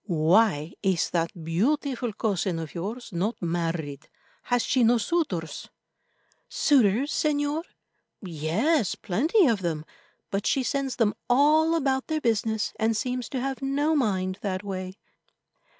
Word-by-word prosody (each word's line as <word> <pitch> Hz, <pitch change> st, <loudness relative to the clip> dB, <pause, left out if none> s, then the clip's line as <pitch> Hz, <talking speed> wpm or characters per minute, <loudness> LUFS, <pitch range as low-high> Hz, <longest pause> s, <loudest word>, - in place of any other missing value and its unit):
Why 170 Hz, -1 st, +3 dB
is 190 Hz, -4 st, +1 dB
that 165 Hz, 0 st, -2 dB
beautiful 245 Hz, -, 0 dB
cousin 195 Hz, -4 st, -1 dB
of 160 Hz, -2 st, -6 dB
yours 215 Hz, +8 st, -5 dB
not 195 Hz, +7 st, -1 dB
married? 165 Hz, -4 st, -3 dB, 0.4 s
Has 245 Hz, -1 st, +1 dB
she 255 Hz, -1 st, +2 dB
no 235 Hz, +1 st, +5 dB
suitors?" 215 Hz, -, -2 dB, 0.8 s
"Suitors, 260 Hz, -1 st, +3 dB
Señor? 295 Hz, +2 st, 0 dB, 0.5 s
Yes, 190 Hz, -, 0 dB
plenty 310 Hz, -, +2 dB
of 230 Hz, -7 st, +2 dB
them, 160 Hz, -3 st, -2 dB, 0.5 s
but 195 Hz, +1 st, -1 dB
she 270 Hz, -, +2 dB
sends 275 Hz, 0 st, -1 dB
them 225 Hz, -4 st, +2 dB, 0.2 s
all 305 Hz, +6 st, +4 dB
about 270 Hz, -4 st, 0 dB
their 315 Hz, -1 st, -1 dB
business, 220 Hz, -4 st, 0 dB
and 220 Hz, 0 st, +1 dB
seems 250 Hz, +1 st, -3 dB
to 260 Hz, -, -3 dB
have 270 Hz, 0 st, -3 dB
no 285 Hz, +4 st, +1 dB
mind 190 Hz, -8 st, 0 dB
that 190 Hz, -1 st, -3 dB
way." 185 Hz, -1 st, -5 dB
220 Hz, 135 wpm, -26 LUFS, 180-270 Hz, 0.8 s, no